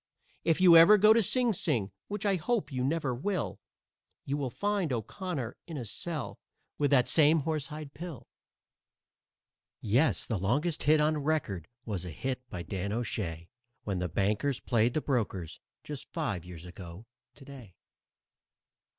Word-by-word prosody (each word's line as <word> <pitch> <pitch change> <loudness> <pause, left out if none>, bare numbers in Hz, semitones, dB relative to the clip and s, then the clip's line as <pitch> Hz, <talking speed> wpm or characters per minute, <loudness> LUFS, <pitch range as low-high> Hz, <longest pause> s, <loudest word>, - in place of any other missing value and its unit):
If 165 0 +2
you 180 -2 +8
ever 170 +6 +9
go 215 +2 +7
to 230 - +4
Sing 240 +2 +2
Sing, 110 - 0 0.2
which 205 0 -4
I 200 - +3
hope 180 - -1
you 130 -1 -2
never 145 -1 0
will, 185 +10 -2 0.7
You'll 140 -1 -2
find 200 - -1
O'Connor 130 - -4
in 165 -3 -6
a 125 - -4
cell 155 - -4 0.4
with 145 -1 +2
that 130 -3 +4
same 155 0 +5
horsehide 150 -1 -4
pill. 165 -5 -8 1.6
_Yes, 115 - +2
the 110 -5 -2
longest 145 - 0
hit 155 +1 +4
on 155 0 +2
record 135 - -1 0.2
was 100 -6 -3
a 90 - -6
hit 130 - -3
by 85 - -5
Dan 100 +2 -4
O'Shay, 100 -8 -3 0.4
When 100 -3 -2
the 90 0 -2
Bankers 105 - 0
played 115 0 +1
the 155 - +1
Brokers, 105 - -2 0.2
just 145 -3 -8
five 110 - -3
years 90 -1 -10
ago 90 +3 -10 0.3
to 140 - -14
day. 130 -9 -12
135 Hz, 150 wpm, -30 LUFS, 105-160 Hz, 1.6 s, ever